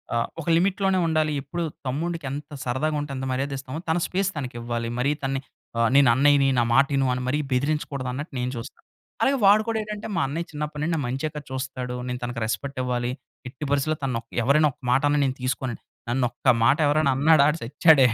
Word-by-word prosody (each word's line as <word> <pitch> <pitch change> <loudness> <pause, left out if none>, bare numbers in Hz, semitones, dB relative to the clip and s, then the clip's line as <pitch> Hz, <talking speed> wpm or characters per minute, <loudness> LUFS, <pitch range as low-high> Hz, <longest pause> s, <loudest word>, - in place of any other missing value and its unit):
ఆహ్, 115 - +1
ఒక 155 - -11
లిమిట్ 185 +3 +1
లోనే 190 -1 +3
ఉండాలి. 155 -1 +1
ఎప్పుడు 170 +5 -4 0.2
తమ్ముడికి 165 +4 -2
ఎంత 145 +2 -6
సరదాగా 135 +5 -1
ఉంటే 145 -1 -5
ఎంత 130 0 -4
మర్యాద 135 +2 -1
ఇస్తామో, 135 +3 -6
తన 160 - +2
స్పేస్ 190 +1 0
తనకి 130 -5 -5
ఇవ్వాలి. 115 0 -3
మరీ 135 +3 +2
తనని 135 0 -1 0.5
నేను 140 -1 +7
ఆహ్, 120 - +2
అన్నయ్యని 140 0 +5
నా - - +4
మాటి 140 +2 +4
ను 135 - +2
అని 125 - -3
మరి 145 +4 +1
బెదిరించకూడదు 140 0 -1
అన్నట్టు 145 +4 -6
నేను 125 +1 -1
చూస్తా. 115 0 -8 0.4
అలాగే 275 +1 +3
వాడు 205 +2 +6
కూడా 225 -1 0
ఏటంటే 210 0 -6
మా - - +1
అన్నయ్య 165 +5 -3
చిన్నప్పటినుండి 150 +2 -3
నా - - -1
మంచె 135 +5 -2
కదా 150 - -5
చూస్తాడు. 130 -1 -4
నేను 125 0 -3
తనకి 120 -1 -4
రెస్‌పెక్ట్ 135 +4 -3
ఇవ్వాలి. 125 -1 -1 0.4
ఎట్టి 130 +3 -9
పరిస్థిలో 145 +2 +1
తనొక 115 -3 -2 0.2
ఎవరైనా 145 +5 +4
ఒక 140 - -27
మాటన్నా 145 +3 +3
నేను 130 -1 -1
తీసుకోనండి. 130 -2 -2 0.3
నన్ను 125 +1 +1
ఒక్క 130 - 0 0.2
మాట 140 +3 +5
ఎవరైనా 145 -1 +3
అన్నాడా? 150 +1 +5
ఆడు 150 - -1
చచ్చాడే. 140 +3 +5
140 Hz, 200 wpm, -25 LUFS, 130-155 Hz, 0.5 s, నేను